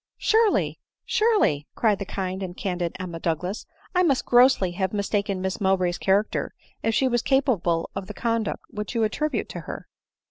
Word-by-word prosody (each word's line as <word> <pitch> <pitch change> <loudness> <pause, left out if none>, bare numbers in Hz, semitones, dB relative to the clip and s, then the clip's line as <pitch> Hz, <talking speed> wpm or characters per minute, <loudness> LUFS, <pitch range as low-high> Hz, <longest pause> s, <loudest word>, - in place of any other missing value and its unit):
c - - -68
* - - -66
Surely, 440 -1 +3 0.3
surely," 430 - +2
cried 215 -4 +2
the 200 - -3
kind 190 0 -4
and 180 -1 -5
candid 180 -3 -2
Emma 175 -2 -5
Douglas, 180 +5 -2
" - - -28
I 360 - +5
must 285 -8 +2
grossly 245 -7 +5
have 190 +2 -2
mistaken 200 -1 -1
Miss 190 +1 -3
Mowbray's 185 -2 +1
character, 200 +2 +1 0.3
if 225 -1 0
she 265 - +3
was 240 -2 +1
capable 220 - +1
of 195 -1 -5
the 210 - -8
conduct 230 -1 -1
which 210 0 -5
you 230 - +2
attribute 300 +8 -1
to - - -6
her - - -7
200 Hz, 185 wpm, -25 LUFS, 185-245 Hz, 0.3 s, I